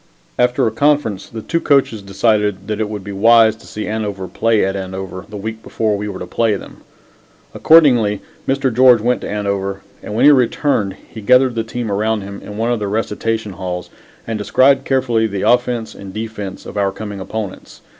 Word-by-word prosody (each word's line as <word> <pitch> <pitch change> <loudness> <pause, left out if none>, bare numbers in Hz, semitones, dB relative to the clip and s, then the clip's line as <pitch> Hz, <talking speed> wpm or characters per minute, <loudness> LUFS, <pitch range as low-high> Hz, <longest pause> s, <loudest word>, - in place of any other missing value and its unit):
After 125 0 +2
a 110 - +1
conference, 140 -6 0
the 110 -2 -7
two 165 - -1
coaches 135 -8 +2
decided 105 0 0
that 105 -1 -3
it 105 - -1
would 105 -2 -6
be 100 - -7
wise 110 +2 +5
to - - -16
see 105 - -5
Andover 105 -3 -3
play 115 -1 +1
at 95 0 -2
Andover 95 -1 -6
the 105 - -7
week 110 +2 -6
before 110 -2 -1
we 105 +1 -4
were 95 - -6
to 90 - -6
play 110 +3 +1
them. - - -10 0.8
Accordingly, 125 -11 +5 0.3
Mr. 135 -2 +1
George 125 -1 +6
went 120 +3 0
to - - -5
Andover, 100 -1 -2 0.2
and 105 - -6
when 115 - +3
he 150 - +9
returned, 125 -6 +1
he 110 - -10
gathered 125 +3 +4
the 115 -1 -1
team 115 -1 -4
around 110 +2 0
him 100 0 -8
in 105 - -9
one 115 +2 0
of 120 - 0
the 105 - -2
recitation 110 +1 -2
halls 90 -1 -5 0.3
and 110 -2 -3
described 135 +6 +3
carefully 120 -4 +1
the 100 -2 -4
offense 120 -2 +1
and 100 -1 -10
defense 110 -3 -6
of - - -8
our 100 -1 +1
coming 100 0 -7
opponents. 100 0 -6
110 Hz, 195 wpm, -18 LUFS, 100-120 Hz, 0.8 s, he